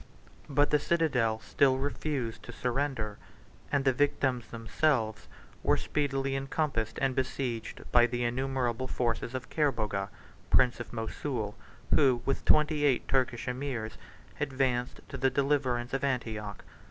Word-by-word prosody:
But 145 +1 +3
the 150 - +5
citadel 135 -9 +1
still 135 -2 +3
refused 135 -4 -2
to - - -9
surrender; 125 -4 -2 0.5
and 140 -1 +1
the 135 - +5
victims 130 -3 +1
themselves 115 0 0 0.3
were - - +3
speedily 135 -2 -1
encompassed 135 -5 -1
and 135 -1 +1
besieged 130 -3 -2
by 120 0 +6
the 120 0 -2
innumerable 130 0 -1
forces 120 0 -1
of 130 0 -5
Kerboga, 110 -10 0 0.4
prince 125 -1 +4
of 120 - -6
Mosul, 115 -1 -3 0.4
who, 130 -5 +4
with 135 - -1
twenty 150 0 +4
eight 135 -4 +2
Turkish 125 -3 +1
emirs, 125 -4 -3 0.4
advanced 130 -2 0
to 140 - -6
the 135 +1 +3
deliverance 130 -3 0
of 135 - -1
Antioch. 110 -6 -2
130 Hz, 130 wpm, -30 LUFS, 120-140 Hz, 0.5 s, by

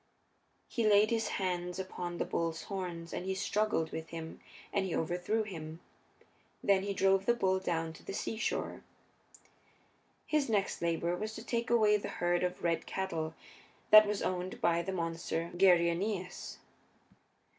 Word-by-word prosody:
He 235 - -1
laid 210 +1 +5
his 225 -1 +1
hands 180 -2 -2
upon 180 -2 -4
the - - -1
bull's 165 -1 -2
horns 175 -4 -5
and - - -3
he 190 0 -2
struggled 205 -4 0
with 160 0 -5
him 165 -1 -7 0.3
and 200 - +2
he 180 - -2
overthrew 180 +7 0
him. 160 -5 -7 0.8
Then 195 -1 +4
he 200 +1 -2
drove 195 0 +3
the 240 - +5
bull 190 -4 +2
down 165 -3 -2
to - - -14
the - - -6
seashore. 220 +3 -2 1.4
His 300 -4 +1
next 205 -3 0
labor 170 +1 0
was 215 +4 -4
to 225 - -8
take 235 -1 -1
away 215 -3 +5
the 205 - -5
herd 175 0 +1
of 180 0 -2
red 170 -1 0
cattle 165 -4 -3 0.6
that 215 0 +10
was 205 -1 -1
owned 185 0 -2
by 170 0 +2
the 185 +3 -4
monster 165 -1 -2
Geryoneus. 180 +1 +2
185 Hz, 155 wpm, -32 LUFS, 170-205 Hz, 1.4 s, that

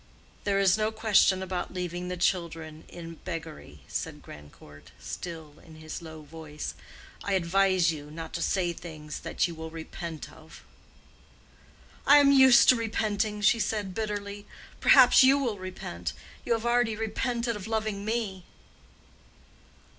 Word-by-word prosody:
"There 200 -1 +1
is 195 +1 +4
no 215 +1 +1
question 210 -4 +3
about 185 0 -4
leaving 180 0 -4
the 180 0 -4
children 165 -3 -2
in 165 -1 -10
beggary," 160 - -7
said - - -5
Grandcourt, 75 0 -14
still 160 - -8
in 160 -1 -14
his 155 +2 -8
low 160 -2 -10
voice. 150 0 -7 0.5
"I 200 - -1
advise 185 -1 +3
you 150 -2 -8
not 160 +1 -8
to - - -3
say 180 -3 0
things 155 -3 -8
that - - -1
you 170 - -7
will 160 0 -7
repent 165 0 -7
of." 160 0 -15 1.4
"I 290 - +9
am 285 -1 +6
used 265 -3 +7
to 255 - +8
repenting," 215 -2 -1
said 215 0 +2
she, - - -9
bitterly. 205 -1 -4 0.3
"Perhaps 260 -1 +7
you 270 +2 +6
will 240 -8 -2
repent. 135 - -6 0.3
You - - +2
have 225 0 -2
already 240 -2 +2
repented 235 +2 -2
of 210 -1 -7
loving 215 -2 -2
me." 210 -4 -3
185 Hz, 145 wpm, -28 LUFS, 160-220 Hz, 1.4 s, I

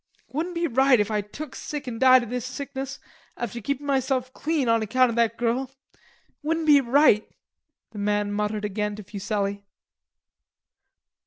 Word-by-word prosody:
"It - - -30
wouldn't 340 +5 -2
be 335 0 0
right 265 -3 +4
if 210 +1 0
I 210 -1 +1
took 260 +9 -9
sick 295 -2 -6
an' 230 -2 -5
died 255 -1 +7
of 240 - -8
this 250 -1 -2
sickness, 270 +1 -6 0.4
after 235 0 -4
keepin' 280 +5 -3
myself 265 -2 0
clean 300 -3 -1
on 230 -1 +3
account 245 +3 +3
of - - -5
that 230 -1 +2
girl.... 245 +2 0 0.2
It - - -31 0.4
wouldn't 320 +1 -1
be 290 -2 +7
right," 255 -4 +4 0.6
the 210 - -8
man 205 0 0
muttered 210 0 -1
again 210 +1 -2
to 210 - -9
Fuselli. 200 0 -3
245 Hz, 170 wpm, -25 LUFS, 210-275 Hz, 0.6 s, died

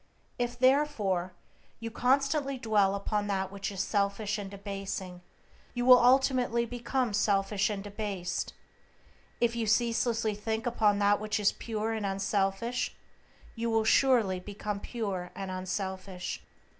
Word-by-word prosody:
If, 240 0 -1
therefore, 240 -9 +2 0.5
you 230 0 -5
constantly 275 +3 +1
dwell 210 -5 +2
upon 205 +1 -1
that 190 -1 -1
which 200 +1 -4
is 195 -1 -2
selfish 205 +1 0
and 200 -1 -5
debasing, 195 -2 -6 0.5
you 245 0 -1
will 250 -1 +9
ultimately 250 -2 +3
become 245 0 -2
selfish 200 0 +2
and 200 -2 -3
debased; 205 -3 -3 0.9
if 235 -1 +2
you 230 -2 -1
ceaselessly 230 0 +1
think 220 +2 -3
upon 215 -4 +2
that 205 0 +3
which 215 +1 -1
is 205 - +3
pure 225 -1 -3
and 220 -1 -3
unselfish 195 +4 -1 0.6
you 230 0 -2
will 225 -1 +2
surely 220 -5 +3
become 205 +2 -5
pure 200 -6 -4
and 195 -1 -5
unselfish. 185 0 -4
210 Hz, 130 wpm, -30 LUFS, 195-235 Hz, 0.9 s, will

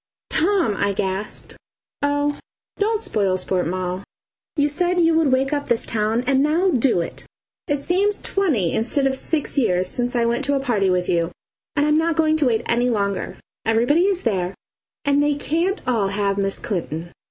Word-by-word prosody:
"Tom!" 345 - +2
I 200 0 +1
gasped. 195 +2 -4 0.5
"Oh, 290 0 0 0.4
don't 435 +1 +1
spoil 195 -3 0
sport, 185 -2 -1
Moll! 185 +1 -2 0.5
You 290 -2 +3
said 355 +4 0
you 330 -1 +4
would 320 -4 +3
wake 265 +2 +2
up 285 -1 -2
this 235 - +1
town, 220 +2 0
and 270 +1 +3
now 330 +6 +2
do 245 - +2
it. 170 - -7 0.4
It 290 -1 -1
seems 400 +3 +1
twenty 290 - 0
instead 260 +5 0
of 270 0 +1
six 295 +1 -1
years 185 -7 +1
since 245 +3 -1
I 235 -1 +2
went 235 +4 0
to 285 +1 +1
a - - +1
party 225 -8 +1
with 180 -1 +1
you, 170 -1 +1 0.5
and 290 -1 +2
I'm 300 0 +3
not 325 0 +1
going 315 -1 +3
to 295 -4 +2
wait 230 -1 +1
any 240 +1 +1
longer. 200 -4 -1 0.3
Everybody 245 - +3
is 385 -2 0
there, 190 -5 -1 0.5
and 285 0 +3
they 290 0 +2
can't 335 +7 -1
all 225 -6 +2
have 200 0 -1
Miss 195 0 0
Clinton." 170 -4 -4
255 Hz, 185 wpm, -22 LUFS, 200-305 Hz, 0.5 s, you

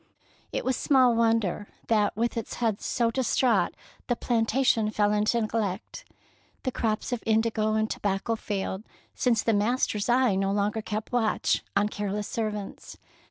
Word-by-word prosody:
It - - -3
was 260 0 +1
small 255 -3 +4
wonder 225 -4 +1 0.2
that 210 -3 +2
with 235 +1 0
its 230 -2 -4
head 225 -4 -1
so 235 -2 0
distraught 255 -1 +1 0.3
the 245 - +1
plantation 230 -1 +1
fell 210 -1 +1
into 210 +3 +2
neglect. 215 -3 -3 0.6
The 255 - -1
crops 220 0 -2
of 240 - -2
indigo 220 -1 +1
and 220 0 +1
tobacco 205 +2 -1
failed, 195 -3 -3 0.3
since 235 -4 +1
the 225 - +2
master's 215 0 0
eye 245 -2 +4
no 195 +1 0
longer 205 +2 0
kept 215 0 -4
watch 235 -3 +1
on 205 - +3
careless 205 0 -3
servants. 210 -3 -5
220 Hz, 150 wpm, -27 LUFS, 210-235 Hz, 0.6 s, small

